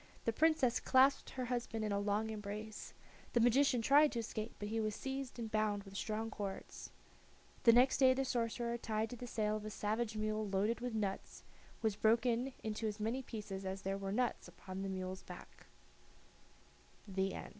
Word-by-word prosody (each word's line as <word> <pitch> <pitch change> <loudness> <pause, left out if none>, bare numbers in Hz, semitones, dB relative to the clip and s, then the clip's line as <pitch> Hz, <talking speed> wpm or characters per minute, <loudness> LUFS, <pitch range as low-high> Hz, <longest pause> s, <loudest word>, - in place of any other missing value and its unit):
The 230 - +1
Princess 300 -3 +3
clasped 270 +1 +4
her 255 -1 -4
husband 235 -3 -2
in 210 - -1
a 200 - +1
long 210 +2 0
embrace. 210 0 -6 0.4
The 240 - +4
magician 245 +1 +4
tried 290 +4 +6
to 235 - -1
escape, 220 0 -5
but 205 - -5
he 225 +1 -1
was 215 -1 -1
seized 270 -1 -4
and 225 -2 -5
bound 215 -2 +1
with 195 0 -12
strong 220 +2 -2
cords. 200 -2 -6 0.8
The 230 - +10
next 250 +3 +5
day 260 -1 +6
the 270 +1 0
sorcerer, 235 -1 -1
tied 220 0 -1
to - - -4
the 245 +1 -7
tail 215 -2 0
of 215 - -8
a - - -3
savage 215 +1 -2
mule 215 0 -1
loaded 200 +4 +1
with 245 -2 -3
nuts, 200 -3 -3 0.4
was 220 -2 +2
broken 235 +4 +2
into 220 0 -2
as 210 0 -4
many 225 +5 -1
pieces 210 -6 -6
as 190 +1 -4
there 195 +1 -1
were 195 0 -3
nuts 245 +3 0
upon 190 0 -8
the 195 - -3
mule's 185 0 -4
ba - - -9
220 Hz, 180 wpm, -36 LUFS, 210-245 Hz, 0.8 s, The